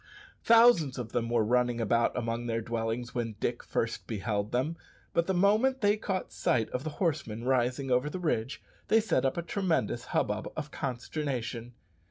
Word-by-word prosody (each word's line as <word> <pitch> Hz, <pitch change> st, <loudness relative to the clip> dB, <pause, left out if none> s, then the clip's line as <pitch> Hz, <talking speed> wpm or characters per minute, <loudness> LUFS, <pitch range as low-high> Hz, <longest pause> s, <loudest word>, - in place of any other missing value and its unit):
Thousands 225 Hz, -, +5 dB
of 120 Hz, -3 st, -5 dB
them 115 Hz, -1 st, -1 dB
were 120 Hz, -2 st, +2 dB
running 120 Hz, +1 st, +2 dB
about 115 Hz, +1 st, +1 dB
among 115 Hz, 0 st, -2 dB
their 115 Hz, -1 st, 0 dB
dwellings 115 Hz, +1 st, -3 dB
when 115 Hz, -3 st, -3 dB
Dick 120 Hz, 0 st, -1 dB
first 115 Hz, 0 st, -3 dB
beheld 105 Hz, -1 st, -2 dB
them; 135 Hz, +7 st, 0 dB, 0.4 s
but 170 Hz, 0 st, +2 dB
the 190 Hz, -, +1 dB
moment 215 Hz, +8 st, +3 dB
they 205 Hz, 0 st, +4 dB
caught 195 Hz, -3 st, -3 dB
sight 115 Hz, -3 st, +1 dB
of 125 Hz, -, -3 dB
the 155 Hz, -, -3 dB
horsemen 145 Hz, -, -1 dB
rising 130 Hz, +1 st, +1 dB
over 125 Hz, +4 st, +2 dB
the 170 Hz, -, -5 dB
ridge 145 Hz, -8 st, -2 dB, 0.2 s
they 225 Hz, -, +5 dB
set 210 Hz, -, +1 dB
up 135 Hz, -, 0 dB
a 170 Hz, -, -1 dB
tremendous 160 Hz, -, -1 dB
hubbub 105 Hz, +1 st, -1 dB
of 150 Hz, -1 st, -4 dB
consternation. 125 Hz, -3 st, -4 dB
125 Hz, 175 wpm, -30 LUFS, 115-165 Hz, 0.4 s, Thousands